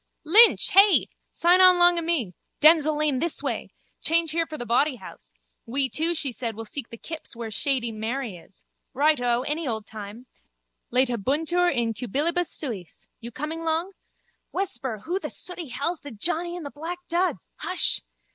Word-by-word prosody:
Pflaaaap! 310 - -15
Lynch! 455 +4 +8
Hey? 395 0 +6 0.2
Sign 355 +2 +4
on 365 -1 +8
long 350 0 +5
o' - - -3
me. 315 - -1 0.3
Denzille 310 -1 +5
lane 300 -4 0
this 335 +2 -2
way. - - -3 0.3
Change 330 0 +1
here 330 +1 -1
for 310 - -7
Bawdyhouse. 240 - -2 0.3
We 265 +3 0
two, 330 +5 0
she 285 -4 -2
said, 230 -2 -4
will 225 +1 -7
seek 235 +2 -7
the 230 - -10
kips 315 0 -8
where 230 -1 -6
shady 255 0 -1
Mary 225 0 -4
is. - - -17 0.3
Righto, 245 -4 +2
any 300 +2 -2
old 220 -3 -2
time. 215 +3 -10 0.7
Laetabuntur 270 - +1
in 235 -4 -1
cubilibus 300 - -1
suis. 220 - -8
You 235 - -7
coming 310 +6 -5
long? 325 +3 -1 0.6
Whisper, 255 - -4
who 360 +4 -1
the - - -6
sooty 355 -3 -7
hell's 290 +7 -3
the 290 - -10
johnny 340 +9 -1
in 350 - -7
the 285 - -7
black 330 +4 -6
duds? 345 - -1
Hush! - - +2
290 Hz, 165 wpm, -25 LUFS, 235-335 Hz, 0.7 s, Lynch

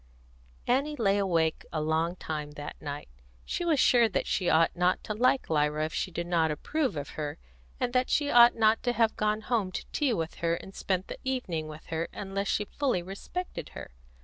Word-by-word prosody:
Annie 280 +4 +1
lay 205 -6 +2
awake 165 -5 +1
a 155 - -1
long 160 +3 0
time 150 -4 -5
that 145 0 -7
night. 145 -1 -5 0.4
She - - -2
was 325 -5 +2
sure 240 -3 +5
that 195 - -1
she 180 -2 0
ought 165 +1 +4
not 180 +1 +1
to 215 - -3
like 255 +4 +2
Lyra 150 0 +1
if 155 - -5
she - - -1
did 170 -1 -4
not 170 -2 +2
approve 260 - -1
of 145 - -4
her, 150 -1 -5 0.4
and 245 - -1
that 255 0 +2
she 290 -1 +2
ought 240 0 +8
not 220 0 +3
to 245 - 0
have 225 -2 +2
gone 215 0 0
home 215 -4 0
to - - -4
tea 290 -4 +1
with 165 -5 -3
her 170 0 +2
and 190 +3 -10
spent 185 -1 -2
the - - -7
evening 190 -12 -2
with 155 0 -10
her 160 +1 -1
unless 195 0 -3
she 210 - 0
fully 250 -6 -1
respected 200 - -6
her. - - -8
190 Hz, 205 wpm, -29 LUFS, 160-240 Hz, 0.4 s, ought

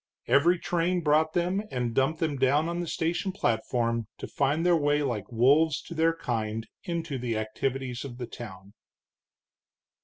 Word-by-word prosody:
Every 170 +6 +4
train 175 +1 0
brought 155 +1 +3
them, 180 +3 +1
and 120 -2 -2
dumped 135 +6 +1
them 155 -4 0
down 140 +4 +3
on 170 0 -2
the 175 - -3
station 170 +5 -1
platform 115 - 0
to - - -6
find 145 +4 0
their 175 -1 +5
way 145 -1 +2
like 115 -7 -3
wolves 145 +7 +4
to - - -8
their 165 0 +2
kind 115 -7 -3
into 165 -5 -3
the 120 -2 -2
activities 125 +3 -3
of 125 -4 -8
the 125 - -4
town. 100 -4 -10
140 Hz, 160 wpm, -28 LUFS, 120-165 Hz, -, their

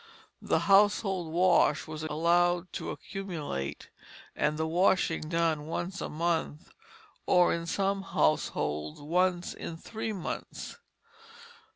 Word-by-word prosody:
The - - +1
household 195 -3 +3
wash 175 -3 +3
was 155 -1 -7
allowed 170 +3 +1
to - - -4
accumulate, 155 - -5 0.4
and 150 0 0
the 160 - 0
washing 165 -2 +2
done 165 -3 0
once 175 +3 -4
a - - -3
month, 165 0 -2 0.6
or 180 -1 +5
in 170 0 -3
some 195 +2 0
households 75 - 0
once 175 +4 0
in 165 - -7
three 220 +5 -5
months. 200 - -6
170 Hz, 110 wpm, -29 LUFS, 155-185 Hz, 0.6 s, or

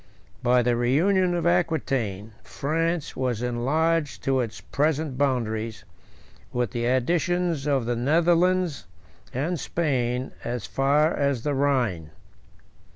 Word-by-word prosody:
By 125 0 +3
the 120 0 +2
reunion 175 +10 +2
of 170 -1 -1
Aquitain, 135 - 0
France 165 +2 -2
was 125 -3 -1
enlarged 145 +6 0
to 135 -1 +1
its 115 -3 -3
present 150 -1 -1
boundaries, 115 -5 -1 0.7
with 120 -4 -1
the 120 0 -2
additions 165 +4 0
of 135 -5 +1
the 120 +1 0
Netherlands 170 - +2 0.4
and 155 +6 -2
Spain, 130 -6 -1
as 120 -3 -3
far 145 +4 +2
as 140 -4 0
the 145 - 0
Rhine. 125 - 0
135 Hz, 115 wpm, -25 LUFS, 120-165 Hz, 0.7 s, By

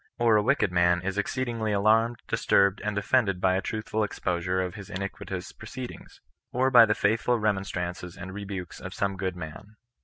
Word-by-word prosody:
Or 115 -2 +4
a 105 - +5
wicked 115 -4 +2
man 90 0 +3
is 95 +1 -2
exceedingly 115 -1 -2
alarmed, 110 +3 +3
disturbed, 100 0 +2
and 105 -1 -2
offended 100 -2 +2
by 95 0 +3
a 95 - 0
truthful 110 +1 -2
exposure 90 -2 -1
of 90 -1 -2
his 100 -3 -9
iniquitous 100 -1 -5
proceedings, 125 +3 -9 0.3
or 130 +2 +2
by 120 -3 +8
the 105 - +2
faithful 115 +3 +2
remonstrances 95 -4 -2
and 95 +1 -7
rebukes 100 -3 -6
of 95 0 -8
some 100 -1 -1
good 95 -1 -3
man. 90 +5 -9
100 Hz, 175 wpm, -27 LUFS, 95-110 Hz, 0.3 s, by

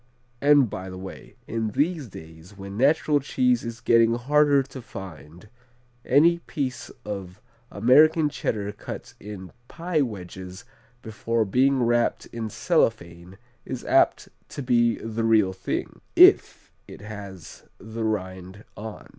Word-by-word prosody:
And 145 -2 +5
by 95 -2 -7
the 95 - -8
way, 95 +1 -10
in 110 -1 -2
these 155 -2 0
days 80 +1 -13
when 100 0 -8
natural 145 +4 +3
cheese 250 - +1
is 115 0 -7
getting 115 0 +4
harder 145 +2 +3
to 130 0 -10
find, 90 -4 -11 0.6
any 165 +6 +4
piece 135 -6 -5 0.2
of 100 -2 -7 0.3
American 150 +8 +4
Cheddar 105 -7 -3
cut 105 - -9
in 100 -3 -9 0.2
pie 170 0 -2
wedges 95 -3 -6 0.4
before 110 +1 -1
being 130 +5 +2
wrapped 120 0 +1
in 115 -2 -4
cellophane 95 - -1 0.3
is - - -7
apt - - +2 0.2
to 140 - -6
be 120 -2 +2
the 115 0 -4
real 110 -4 +3
thing 95 0 -5
if - - +5 0.2
it - - -12
has 100 -4 -10
the 110 +2 -7
rind 95 -2 -4
on. 110 0 -9
115 Hz, 130 wpm, -24 LUFS, 95-135 Hz, 0.6 s, And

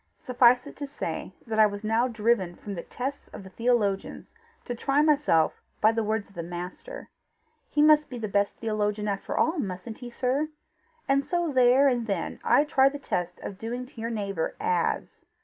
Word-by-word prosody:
Suffice 250 0 +4
it - - -10
to 285 - -5
say 280 - -5
that 220 -2 -2
I 215 - +8
was 205 0 -7
now 225 +3 +2
driven 215 -6 0
from 205 - -7
the 175 - -4
tests 270 +8 -5
of - - -10
the 190 - -12
theologians 220 -4 -1 0.3
to 245 - -3
try 275 +5 +1
myself 295 - +2 0.2
by 220 - +5
the 225 0 -1
words 215 -1 -1
of 200 - -21
the 175 - -5
Master: 175 +2 -7 0.6
he 295 - +2
must 300 0 +5
be 250 - -6
the 225 -2 -3
best 200 0 +1
theologian 210 -1 -1
after 200 -1 -3
all, 320 +1 +2
mustn't 200 0 -5
he, 245 - -7
sir? 260 +5 -1 0.6
and 275 0 +3
so 345 0 -1
there 255 +2 +5
and 240 -3 +1
then 195 -5 -3
I 285 - +5
tried 275 -2 +3
the - - -4
test 180 -10 -3
of 195 - -7
doing 240 +3 -4
to 250 -3 -11
your 230 - -2
neighbour 200 -7 -3
AS. 445 -4 -1
230 Hz, 195 wpm, -27 LUFS, 205-275 Hz, 0.6 s, I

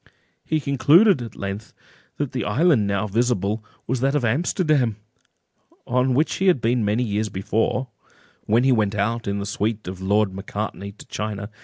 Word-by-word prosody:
He 155 - 0
concluded, 145 - +4
at 115 -3 -7
length, 100 +2 -6 0.4
that 145 -3 -2
the 130 -3 -2
island 125 - +3
now 100 +1 0
visible 110 -1 0 0.2
was 130 +1 -1
that 135 +3 +1
of 140 -5 +1
Amsterdam 140 - +1 0.9
on 125 +1 +1
which 150 +4 +1
he 190 - +1
had 180 -7 +4
been 120 +1 +1
many 105 +4 +1
years 105 -1 -1
before, 110 +7 -1 0.6
when 115 +3 +3
he 135 - +4
went 110 -4 +1
out 115 +3 -1
in 100 0 -1
the 100 - -3
suite 105 +1 -2
of 95 0 -6
Lord 100 +1 +1
Macartney 100 +1 -5
to 105 - -14
China. 105 -1 -5
115 Hz, 170 wpm, -23 LUFS, 105-130 Hz, 0.9 s, concluded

